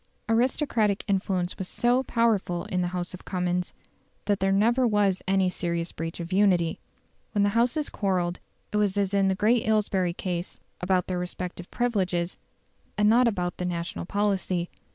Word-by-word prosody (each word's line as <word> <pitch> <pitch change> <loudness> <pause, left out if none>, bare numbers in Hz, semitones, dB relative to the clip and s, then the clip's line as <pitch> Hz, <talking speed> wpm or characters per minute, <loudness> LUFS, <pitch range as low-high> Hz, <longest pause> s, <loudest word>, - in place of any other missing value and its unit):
Aristocratic 225 -3 +1
influence 190 -2 -1
was 190 - -3
so 245 +4 +2
powerful 220 -9 +1
in 180 - -1
the 175 - 0
House 180 0 -3
of 185 - -9
Commons, 180 -1 -1 0.5
that 205 -1 +1
there 195 0 +2
never 235 +6 +3
was 205 -4 +2
any 190 -1 +3
serious 170 -1 -2
breach 165 +2 -5
of 170 +2 -5
unity. 185 -4 +3 0.5
When 205 -2 +2
the 205 - +3
Houses 240 +8 +1
quarrelled, 180 -3 -1 0.3
it 210 - 0
was 205 -1 +1
as 200 -1 0
in 195 -1 +3
the 190 - +2
great 220 +4 +3
Aylesbury 200 -5 +1
case, 175 -1 -4 0.2
about 180 0 +1
their 180 -1 -2
respective 180 0 -5
privileges, 185 -8 -1 0.6
and 210 0 +4
not 240 +2 +5
about 180 -5 -1
the 180 - -3
national 170 -1 -3
policy. 190 -4 0
190 Hz, 165 wpm, -26 LUFS, 180-210 Hz, 0.6 s, not